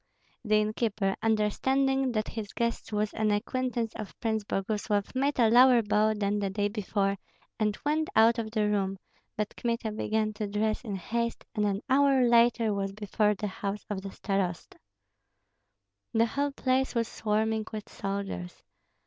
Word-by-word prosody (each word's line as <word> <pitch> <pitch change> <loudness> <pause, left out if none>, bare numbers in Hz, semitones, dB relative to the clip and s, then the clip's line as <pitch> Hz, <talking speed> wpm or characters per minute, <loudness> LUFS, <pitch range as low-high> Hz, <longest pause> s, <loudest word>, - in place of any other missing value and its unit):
The 215 -2 +2
innkeeper, 215 -2 0
understanding 265 +5 +1
that 215 -1 -1
his 215 -3 -6
guest 235 -1 -2
was 210 0 -1
an 215 -1 0
acquaintance 235 +2 -1
of 215 -2 -8
Prince 220 -2 -1
Boguslav, 205 0 -1
made 275 +2 0
a 235 -3 +5
lower 245 0 +7
bow 215 +1 +2
than 205 0 0
the 200 -1 -1
day 205 +1 0
before, 200 -1 -1 0.4
and 210 -1 +1
went 310 +2 +1
out 225 +1 +5
of 220 -1 -3
the 215 -1 0
room; 195 -2 0 0.4
but 210 -1 -2
Kmita 230 -2 -2
began 215 0 -1
to 210 0 -3
dress 215 +3 -1
in 210 -5 -4
haste, 235 +5 -3
and 210 -1 +1
an 200 0 -1
hour 270 -1 +4
later 235 -2 +4
was 195 -1 -2
before 210 0 +1
the 210 - -4
house 200 +1 -4
of 195 -2 -2
the 195 - -6
starosta. 190 -4 -3 1.3
The 225 0 +4
whole 280 +5 -1
place 260 -1 0
was 230 -1 +1
swarming 220 0 0
with 215 -1 -6
soldiers. 195 -3 -5
215 Hz, 160 wpm, -29 LUFS, 205-235 Hz, 1.3 s, lower